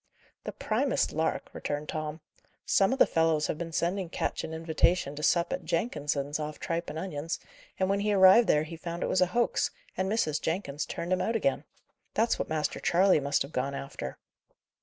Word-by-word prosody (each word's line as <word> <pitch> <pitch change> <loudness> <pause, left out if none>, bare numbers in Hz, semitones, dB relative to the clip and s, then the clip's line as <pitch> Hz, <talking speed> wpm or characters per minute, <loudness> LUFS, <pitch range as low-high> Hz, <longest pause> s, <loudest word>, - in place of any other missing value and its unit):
"The - - -3
primest - - 0
lark," - - -1
returned 145 +1 -4
Tom. 155 0 -4 0.4
"Some 195 +3 +3
of 265 - 0
the - - +7
fellows 160 -2 +2
have 155 - -3
been 170 -1 -4
sending 175 +3 -1
Ketch - - -2
an - - -5
invitation 160 -1 +1
to 150 - -6
sup 170 +2 +2
at - - -3
Jenkins's 145 - -1
off 150 0 -5
tripe 170 -2 -3
and 150 - -6
onions, 160 -2 -3 0.4
and 190 - +1
when 200 +1 +1
he 210 +1 +1
arrived 195 +3 +7
there 150 -3 +4
he 160 +2 -7
found 170 +1 -5
it - - 0
was 185 - +2
a 185 - +5
hoax, 235 +6 +1 0.3
and 190 +1 -1
Mrs. 155 -9 0
Jenkins 160 -4 -2
turned 175 +2 -2
him 185 - +1
out 225 +5 0
again. 275 +5 0 0.5
That's 230 +2 +2
what - - -2
Master 155 -1 -1
Charley 185 -1 +4
must 140 0 +1
have 140 - -10
gone 135 +1 -2
after." 135 - -6
165 Hz, 200 wpm, -29 LUFS, 150-190 Hz, 0.5 s, the